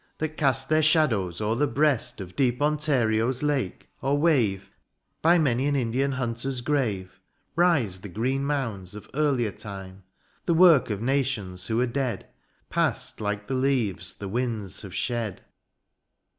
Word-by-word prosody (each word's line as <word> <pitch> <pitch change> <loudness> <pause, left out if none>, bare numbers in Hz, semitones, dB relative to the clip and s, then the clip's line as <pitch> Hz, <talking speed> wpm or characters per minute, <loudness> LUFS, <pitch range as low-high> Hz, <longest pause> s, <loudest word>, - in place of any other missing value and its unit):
That 155 - -1
cast 135 -3 +1
their 155 0 +3
shadows 120 - +2
o'er 105 +1 +1
the 145 +4 +2
breast 140 -1 +1
THE 95 - -5
AREOPAGITE. 90 - -11
Of - - -32
deep 125 -2 +1
Ontario's 130 -5 +1
lake, 145 -3 -1
or 140 +2 +1
wave 110 - +1 0.5
By 170 +2 +5
many 135 -4 +2
an 145 - +1
Indian 135 +2 0
hunter's 125 +1 -2
grave, 105 -10 -1 0.4
Rise 145 - +2
the 100 - -9
green 130 +8 -1
moonds 115 -10 -3
of 105 - -10
earlier 135 -7 +1
time; 95 -2 -8
(d) - - -20 0.5
The 170 - +4
work 165 -7 +6
of 105 0 -3
nations, 120 -9 -1
who 115 0 0
are - - +3
dead. 125 -4 -2 0.4
Past - - -1
like 105 0 -2
the 135 - -4
leaves 130 -7 0
the 100 - -7
winds 110 -3 -3
have 95 -2 -9
shed. 115 0 -2
125 Hz, 160 wpm, -26 LUFS, 105-140 Hz, 0.5 s, work